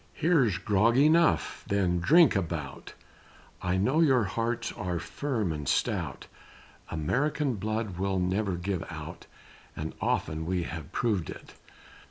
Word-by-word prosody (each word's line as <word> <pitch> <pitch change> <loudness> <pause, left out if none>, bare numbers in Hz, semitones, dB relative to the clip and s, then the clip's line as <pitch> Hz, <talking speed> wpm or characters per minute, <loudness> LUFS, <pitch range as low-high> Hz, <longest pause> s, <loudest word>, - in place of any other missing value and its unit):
Here's 135 - +2
grog 105 +6 +2
enough 160 +4 +3
then 95 -4 +1
drink 155 - +5
a 95 - +3
bout, 80 -6 -6 0.7
I 90 +1 0
know 130 +11 +2
your 130 -7 +4
hearts 115 +4 -2
are 90 -2 -3
firm 110 - -2
and 75 -3 -4
stout; - - -1 0.6
American 135 - 0
blood 110 -2 -3
will 95 0 0
never 95 +1 0
give 90 +1 -3
out, - - -8 0.5
And 80 +1 -5
often 80 +1 -1
we 90 -1 0
have 80 -3 -7
proved 105 -8 0
it. - - -10
100 Hz, 135 wpm, -28 LUFS, 85-120 Hz, 0.7 s, drink